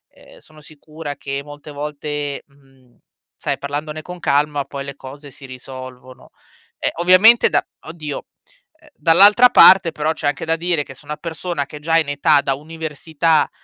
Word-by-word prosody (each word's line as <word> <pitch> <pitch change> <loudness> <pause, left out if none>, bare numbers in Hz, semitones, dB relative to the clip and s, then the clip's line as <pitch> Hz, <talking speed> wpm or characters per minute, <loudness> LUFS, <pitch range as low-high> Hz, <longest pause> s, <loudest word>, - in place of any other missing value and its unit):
uhm, - - -19
sono 155 - -19
sicura 155 0 -10
che 140 0 -5
molte 145 +1 -12
volte, 145 0 -5
mhmm, 135 -3 -27 0.5
sai - - -1
parlandone 150 +2 -5
con 180 +3 -10
calma, 145 0 0
poi 140 0 -8
le 140 - -8
cose 140 +2 -12
si 135 +1 -14
risolvono. 130 0 -12 0.5
Ehm, - - -1
ovviamente 185 +7 +6
da - - +1 0.2
oddio, 155 -3 -7 0.6
uhm, 310 - -23
dall'altra 205 +9 +6
parte 185 -7 +7
però 155 +1 -2
c'è 155 - -4
anche 145 - -2
da 165 0 0
dire 170 -2 -1
che 135 - -12
se 135 - -17
una 150 +1 -6
persona 165 -2 -5
che 150 +2 -11
è - - -12
già 165 +1 +1
in 155 - -1
età 145 +1 +3
da 135 - -1
università, 160 +1 -1
150 Hz, 170 wpm, -19 LUFS, 140-165 Hz, 0.6 s, parte